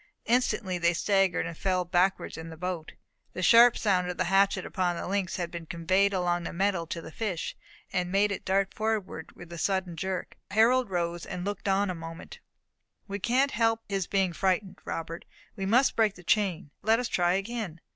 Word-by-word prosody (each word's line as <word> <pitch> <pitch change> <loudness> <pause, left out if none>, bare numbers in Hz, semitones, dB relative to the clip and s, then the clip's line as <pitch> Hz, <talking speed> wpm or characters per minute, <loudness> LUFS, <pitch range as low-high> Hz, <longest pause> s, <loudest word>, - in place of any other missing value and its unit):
Instantly 225 -6 +1
they 170 0 +2
staggered, 195 -1 +2
said 165 - -6
fell 185 -2 0
backwards 180 +2 +1
in 160 0 -7
the 160 - -10
boat. 180 -2 -4 0.4
The 185 - -4
sharp 235 +4 +7
sound 185 -4 +1
of 180 - -4
the - - +1
hatchet 195 +2 +2
upon 180 -2 -1
the - - -5
links 195 -1 -1
had 175 -2 -3
been 170 -2 -7
conveyed 185 +4 +2
along 175 -2 0
the - - -5
metal 185 -2 0
to 165 +1 -5
the - - -9
fish, 190 -3 -3 0.4
and 180 -1 -1
made 200 +2 +3
it 195 - -4
dart 195 0 +1
forward 220 -2 -2
with 175 -1 -11
a 170 - -6
sudden 190 -1 -1
jerk. 190 +2 -4
Harold 230 +3 +4
rose, 175 -1 -2
and 180 -1 -5
looked 205 0 -4
on 195 0 +2
a - - -3
moment. 165 - -9 0.7
"We 200 0 -4
can't 260 +7 +2
help 225 0 +1
his 195 -3 -2
being 190 -3 +1
frightened, 190 +1 0
Robert. 165 +1 -5 0.3
We 195 -2 -3
must 250 +6 +4
break 220 -3 +2
the 180 - -14
chain. 180 -6 0
Let 220 +2 +3
us 250 - -1
try 175 -4 +2
again." 195 -3 -3
190 Hz, 195 wpm, -28 LUFS, 175-205 Hz, 0.7 s, sharp